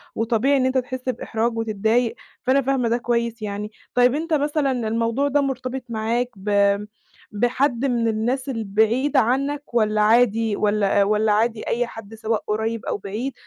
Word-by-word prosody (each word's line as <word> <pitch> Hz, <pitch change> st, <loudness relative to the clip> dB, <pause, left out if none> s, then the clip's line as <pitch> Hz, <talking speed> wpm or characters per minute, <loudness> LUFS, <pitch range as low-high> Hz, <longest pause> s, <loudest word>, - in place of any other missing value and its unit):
وطبيعي 235 Hz, +5 st, +2 dB
إن 260 Hz, -, +2 dB
أنت 260 Hz, 0 st, +1 dB
تحس 255 Hz, 0 st, -3 dB
بإحراج 230 Hz, -1 st, -2 dB
وتتضايق، 225 Hz, +2 st, 0 dB, 0.3 s
فأنا 270 Hz, +2 st, +3 dB
فاهمة 255 Hz, -3 st, 0 dB
ده 235 Hz, -, +2 dB
كويس 235 Hz, -1 st, -1 dB
يعني. 210 Hz, +1 st, -4 dB, 0.2 s
طيب 250 Hz, +2 st, +4 dB
أنت 325 Hz, +1 st, -2 dB
مثلًا 290 Hz, -1 st, +1 dB
الموضوع 230 Hz, +3 st, 0 dB
ده 285 Hz, +1 st, +2 dB
مرتبط 265 Hz, -1 st, -3 dB
معاك 230 Hz, +2 st, -1 dB
ب 200 Hz, 0 st, +2 dB, 0.5 s
بحد 245 Hz, +4 st, 0 dB
من 235 Hz, -3 st, +1 dB
الناس 245 Hz, +5 st, -1 dB
البعيدة 225 Hz, +4 st, +1 dB
عنك 275 Hz, +3 st, -1 dB
والّا 215 Hz, -2 st, +2 dB
عادي 225 Hz, -1 st, +3 dB
والّا 205 Hz, -1 st, +2 dB
والّا 210 Hz, +1 st, +2 dB
عادي 220 Hz, +1 st, 0 dB
أي 240 Hz, 0 st, 0 dB
حد 225 Hz, -1 st, -10 dB
سواء 220 Hz, -1 st, -2 dB
قريب 220 Hz, +1 st, -2 dB
أو -, -, -2 dB
بعيد 215 Hz, +7 st, -4 dB
230 Hz, 155 wpm, -22 LUFS, 215-255 Hz, 0.5 s, طيب